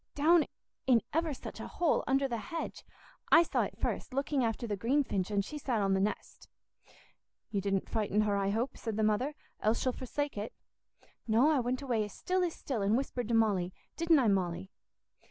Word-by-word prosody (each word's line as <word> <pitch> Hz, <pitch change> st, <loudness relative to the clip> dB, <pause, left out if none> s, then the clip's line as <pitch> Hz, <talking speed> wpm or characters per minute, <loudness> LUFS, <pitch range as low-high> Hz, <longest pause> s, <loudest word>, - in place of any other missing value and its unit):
"Down 315 Hz, +2 st, +5 dB, 0.4 s
in 240 Hz, -4 st, +5 dB
ever 325 Hz, +1 st, +1 dB
such 265 Hz, -, -7 dB
a -, -, -5 dB
hole, 345 Hz, -3 st, +1 dB
under 270 Hz, +1 st, +2 dB
the 235 Hz, -3 st, -3 dB
hedge. 320 Hz, +11 st, -5 dB, 0.5 s
I 335 Hz, -, +8 dB
saw -, -, 0 dB
it -, -, -3 dB
first, 255 Hz, -, -3 dB
looking 275 Hz, -1 st, +1 dB
after 230 Hz, +1 st, -1 dB
the 210 Hz, -3 st, -1 dB
greenfinch, 230 Hz, -4 st, 0 dB
and 200 Hz, -1 st, 0 dB
she 300 Hz, +4 st, -6 dB
sat 250 Hz, -5 st, 0 dB
on 195 Hz, -1 st, +2 dB
th' 190 Hz, -, +2 dB
nest." 210 Hz, +2 st, -3 dB, 1.0 s
"You 200 Hz, -2 st, 0 dB
didn't 195 Hz, -1 st, 0 dB
frighten 210 Hz, -1 st, +1 dB
her, 210 Hz, -1 st, +1 dB
I 195 Hz, 0 st, +1 dB
hope," 225 Hz, +6 st, -1 dB
said 225 Hz, -3 st, -3 dB
the 220 Hz, -, +1 dB
mother, 245 Hz, +8 st, +1 dB, 0.3 s
"else 215 Hz, +2 st, +2 dB
she'll 255 Hz, -, +1 dB
forsake 265 Hz, 0 st, -3 dB
it." 210 Hz, -, -5 dB, 0.7 s
"No, 235 Hz, +8 st, +4 dB
I 295 Hz, -, +3 dB
went 250 Hz, +2 st, -1 dB
away 235 Hz, -5 st, +1 dB
as 210 Hz, -, -7 dB
still 370 Hz, 0 st, 0 dB
as 345 Hz, -2 st, -1 dB
still, 250 Hz, -7 st, -3 dB
and 205 Hz, +4 st, +3 dB
whispered 250 Hz, -3 st, -3 dB
to 235 Hz, -, +1 dB
Molly—didn't 220 Hz, -, +1 dB
I, 255 Hz, -5 st, +3 dB
Molly?" 190 Hz, -1 st, 0 dB
235 Hz, 195 wpm, -32 LUFS, 205-280 Hz, 1.0 s, I